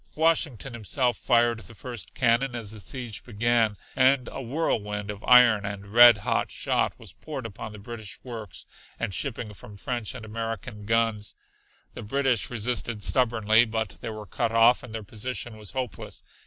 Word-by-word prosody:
Washington 150 Hz, -, +1 dB
himself 120 Hz, +3 st, 0 dB
fired 120 Hz, -2 st, +2 dB
the 115 Hz, +1 st, -13 dB
first 110 Hz, -3 st, -7 dB
cannon 125 Hz, +1 st, +2 dB
as 110 Hz, -3 st, -4 dB
the 110 Hz, -, -7 dB
siege 120 Hz, +1 st, -5 dB
began, 115 Hz, -1 st, +1 dB, 0.2 s
and 130 Hz, 0 st, +4 dB
a -, -, -6 dB
whirlwind 105 Hz, -7 st, -2 dB
of 105 Hz, 0 st, -10 dB
iron 125 Hz, -4 st, +7 dB
and 100 Hz, 0 st, -6 dB
red 120 Hz, +1 st, +9 dB
hot -, -, +1 dB
shot -, -, 0 dB
was -, -, -11 dB
poured 140 Hz, -6 st, -7 dB
upon 110 Hz, 0 st, -7 dB
the 105 Hz, -, -10 dB
British 110 Hz, 0 st, -7 dB
works 115 Hz, -6 st, -8 dB, 0.3 s
and 100 Hz, -, -2 dB
shipping 115 Hz, -3 st, -3 dB
from 100 Hz, +1 st, -13 dB
French 120 Hz, +1 st, -3 dB
and 115 Hz, -4 st, -8 dB
American 115 Hz, 0 st, -5 dB
guns. 115 Hz, -1 st, 0 dB, 0.6 s
The -, -, -7 dB
British 135 Hz, +1 st, 0 dB
resisted 120 Hz, -2 st, -2 dB
stubbornly, 115 Hz, -2 st, +4 dB
but 110 Hz, -2 st, -3 dB
they -, -, -4 dB
were 110 Hz, -1 st, -7 dB
cut 115 Hz, +1 st, -1 dB
off 115 Hz, +2 st, +5 dB
and 125 Hz, -, -11 dB
their 110 Hz, -1 st, -5 dB
position 115 Hz, +2 st, -5 dB
was 105 Hz, +2 st, -9 dB
hopeless. 125 Hz, -9 st, -5 dB
115 Hz, 170 wpm, -26 LUFS, 105-125 Hz, 0.6 s, red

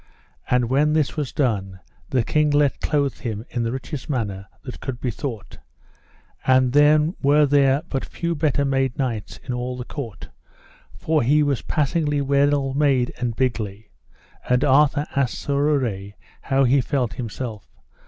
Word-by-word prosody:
And 125 Hz, -1 st, +2 dB
when 145 Hz, +5 st, +2 dB
this 155 Hz, -3 st, +1 dB
was 145 Hz, -4 st, -3 dB
done, 100 Hz, -9 st, -1 dB, 0.3 s
the 125 Hz, -3 st, +1 dB
king 150 Hz, +5 st, +2 dB
let 145 Hz, -1 st, +2 dB
clothe 140 Hz, -3 st, 0 dB
him 110 Hz, -2 st, -5 dB
in 120 Hz, -, -2 dB
the 115 Hz, 0 st, -1 dB
richest 130 Hz, +3 st, -6 dB
manner 100 Hz, -8 st, -3 dB, 0.2 s
that 125 Hz, -, -8 dB
could 130 Hz, -3 st, -5 dB
be 125 Hz, -, -2 dB
thought; 115 Hz, -4 st, -6 dB, 0.8 s
and 130 Hz, -1 st, +3 dB
then 150 Hz, +3 st, +4 dB
were 145 Hz, +1 st, +4 dB
there 140 Hz, 0 st, +3 dB
but 135 Hz, -, -3 dB
few 170 Hz, 0 st, -3 dB
better 145 Hz, -2 st, +1 dB
made 135 Hz, -2 st, 0 dB
knights 120 Hz, -6 st, -3 dB
in 125 Hz, -, -4 dB
all 125 Hz, +1 st, -3 dB
the 125 Hz, -, -6 dB
court, 125 Hz, -8 st, -7 dB, 0.7 s
for 155 Hz, -1 st, +1 dB
he 145 Hz, +5 st, +3 dB
was 140 Hz, -4 st, 0 dB
passingly 150 Hz, -1 st, 0 dB
well 140 Hz, 0 st, +2 dB
made 135 Hz, -4 st, +2 dB
and 120 Hz, -2 st, -2 dB
bigly; 110 Hz, -5 st, -2 dB, 0.6 s
and 125 Hz, +1 st, +3 dB
Arthur 145 Hz, +1 st, +4 dB
asked 135 Hz, -3 st, 0 dB
Sir 145 Hz, -, -3 dB, 0.2 s
Urre 105 Hz, -9 st, -1 dB, 0.3 s
how 135 Hz, 0 st, +1 dB
he 135 Hz, +2 st, +4 dB
felt 125 Hz, -2 st, -1 dB
himself. 115 Hz, -2 st, -6 dB
135 Hz, 160 wpm, -22 LUFS, 120-145 Hz, 0.8 s, then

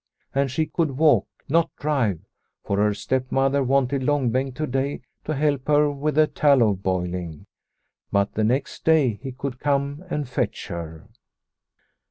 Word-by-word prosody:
And 140 Hz, 0 st, +1 dB
she 155 Hz, +5 st, 0 dB
could 155 Hz, -5 st, -1 dB
walk, 155 Hz, 0 st, +4 dB, 0.2 s
not 165 Hz, +3 st, +2 dB
drive; 130 Hz, -, 0 dB, 0.4 s
for 100 Hz, -, -1 dB
her 105 Hz, +1 st, +3 dB
stepmother 130 Hz, +5 st, 0 dB
wanted 135 Hz, +1 st, +1 dB
Long 135 Hz, -3 st, +1 dB
Bengt 130 Hz, +1 st, -1 dB
to 155 Hz, +2 st, -2 dB
day 135 Hz, +1 st, -2 dB, 0.2 s
to 155 Hz, -, -2 dB
help 140 Hz, -2 st, 0 dB
her 150 Hz, 0 st, +4 dB
with 145 Hz, +1 st, -2 dB
the 155 Hz, 0 st, +6 dB
tallow 135 Hz, -8 st, +3 dB
boiling. 90 Hz, -4 st, -3 dB, 0.7 s
But 100 Hz, 0 st, +1 dB
the 110 Hz, -, 0 dB
next 130 Hz, +6 st, -1 dB
day 145 Hz, -10 st, +3 dB
he 135 Hz, -1 st, -5 dB
could 130 Hz, 0 st, -5 dB
come 140 Hz, +2 st, -1 dB
and 150 Hz, -5 st, -2 dB
fetch 120 Hz, -1 st, -3 dB
her. 80 Hz, -3 st, -7 dB
135 Hz, 155 wpm, -24 LUFS, 110-145 Hz, 0.7 s, the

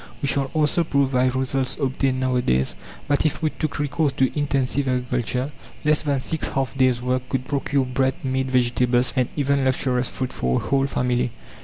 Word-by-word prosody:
We 140 Hz, -, -1 dB
shall 140 Hz, -1 st, +1 dB
also 155 Hz, +2 st, +2 dB
prove 140 Hz, -4 st, +1 dB
by 130 Hz, -1 st, +3 dB
results 130 Hz, +1 st, -1 dB
obtained 135 Hz, -1 st, 0 dB
nowadays, 125 Hz, -, +1 dB, 0.3 s
that 145 Hz, 0 st, +2 dB
if 155 Hz, +1 st, -1 dB
we 155 Hz, -, +2 dB
took 155 Hz, -, -3 dB
recourse 145 Hz, +1 st, 0 dB
to 130 Hz, -1 st, +1 dB
intensive 140 Hz, -2 st, 0 dB
agriculture, 125 Hz, +1 st, -1 dB, 0.3 s
less 150 Hz, 0 st, +3 dB
than 145 Hz, -3 st, 0 dB
6 160 Hz, +4 st, -2 dB
half 135 Hz, -3 st, -2 dB
days' 130 Hz, -2 st, +2 dB
work 125 Hz, 0 st, -1 dB
could 130 Hz, -1 st, -2 dB
procure 140 Hz, -1 st, 0 dB
bread, 130 Hz, +1 st, 0 dB
meat, 130 Hz, 0 st, 0 dB
vegetables, 125 Hz, -1 st, +2 dB
and 130 Hz, -2 st, +1 dB
even 140 Hz, -1 st, +1 dB
luxurious 130 Hz, -1 st, +1 dB
fruit 130 Hz, -1 st, -4 dB
for 65 Hz, 0 st, 0 dB
a -, -, -7 dB
whole 135 Hz, 0 st, +1 dB
family. 125 Hz, -2 st, 0 dB
130 Hz, 180 wpm, -23 LUFS, 125-140 Hz, 0.3 s, by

